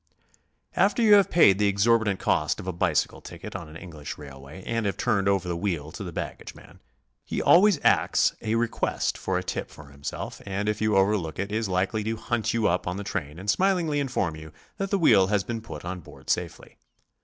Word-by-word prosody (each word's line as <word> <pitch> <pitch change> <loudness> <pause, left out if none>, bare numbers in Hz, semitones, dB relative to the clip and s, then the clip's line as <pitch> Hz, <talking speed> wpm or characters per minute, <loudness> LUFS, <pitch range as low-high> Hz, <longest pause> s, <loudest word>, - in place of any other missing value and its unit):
After 205 +4 +3
you 215 -2 +7
have 200 -3 +6
paid 100 - +5
the 105 - +3
exorbitant 105 0 +2
cost 75 - +1
of 100 - -7
a 95 - -3
bicycle 85 -3 0
ticket - - -9
on 80 - -6
an 80 - -10
English 80 -5 -8
railway 70 +4 -11
and 115 -2 -1
have 100 - -2
turned 100 -2 +1
over 100 -2 +1
the 85 - -1
wdieel 85 -4 -3
to 100 - -6
the 90 - -6
baggage - - -6
man, - - -16 0.4
he - - -3
always 190 -2 +5
acts - - +3
a 110 +1 -1
request 115 0 0
for - - -2
a - - -2
tip - - -4
for 75 -1 -13
himself, 70 +1 -6
and 100 +1 -3
if 105 0 -1
you 110 -1 +2
overlook 95 -5 +1
it, 100 +2 -3
is 110 -1 -1
likely 95 +3 0
to 110 +1 -2
hunt 120 -1 -1
you 115 -2 +1
up 90 +1 0
in 90 +1 -2
the 100 - -4
train 75 -6 -4
and 100 +3 0
smilingly 175 - +1
inform 125 - -1
you 80 0 -10 0.3
that 195 0 -2
the 200 - +2
wheel 105 - +5
has 100 -1 +1
been 115 +2 -4
put 115 -5 -9
on 90 +1 -4
board 85 - -7
safe'ly. - - -4
100 Hz, 215 wpm, -26 LUFS, 85-115 Hz, 0.4 s, you